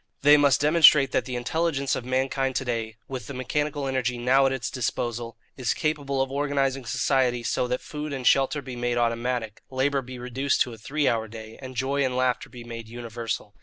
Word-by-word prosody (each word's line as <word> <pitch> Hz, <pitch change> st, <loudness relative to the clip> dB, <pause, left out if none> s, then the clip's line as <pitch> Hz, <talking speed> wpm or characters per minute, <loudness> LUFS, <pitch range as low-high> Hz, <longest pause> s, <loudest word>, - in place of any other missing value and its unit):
They 145 Hz, +1 st, +8 dB
must 140 Hz, -4 st, +4 dB
demonstrate 150 Hz, -3 st, +6 dB
that -, -, +1 dB
the 125 Hz, -, -4 dB
intelligence 140 Hz, +2 st, 0 dB
of -, -, -4 dB
mankind 130 Hz, +1 st, 0 dB
to 130 Hz, -, -1 dB
day, 115 Hz, -2 st, -2 dB
with 130 Hz, -2 st, -6 dB
the 140 Hz, -, -6 dB
mechanical 145 Hz, +3 st, -2 dB
energy 130 Hz, -2 st, -1 dB
now 130 Hz, +3 st, +4 dB
at -, -, 0 dB
its 130 Hz, -4 st, -3 dB
disposal, 120 Hz, -2 st, -3 dB, 0.2 s
is 125 Hz, -3 st, 0 dB
capable 140 Hz, -3 st, 0 dB
of 135 Hz, -, -6 dB
organizing 135 Hz, -2 st, 0 dB
society 125 Hz, 0 st, +1 dB
so 125 Hz, -, 0 dB
that 125 Hz, +1 st, -2 dB
food 150 Hz, 0 st, -6 dB
and 135 Hz, -3 st, -4 dB
shelter 135 Hz, +3 st, +3 dB
be 130 Hz, -1 st, -7 dB
made 120 Hz, 0 st, -1 dB
automatic, 120 Hz, -1 st, -1 dB
labour 135 Hz, +1 st, +1 dB
be 130 Hz, 0 st, -9 dB
reduced 125 Hz, +3 st, -1 dB
to 125 Hz, -, +1 dB
a -, -, -10 dB
three 145 Hz, +5 st, -1 dB
hour 110 Hz, -1 st, +1 dB
day, 110 Hz, 0 st, -10 dB
and 130 Hz, -1 st, -8 dB
joy 135 Hz, +3 st, 0 dB
and 130 Hz, -1 st, 0 dB
laughter 130 Hz, -1 st, 0 dB
be 120 Hz, -1 st, -10 dB
made 115 Hz, -1 st, -8 dB
universal. 115 Hz, -2 st, -5 dB
130 Hz, 205 wpm, -26 LUFS, 120-140 Hz, 0.2 s, They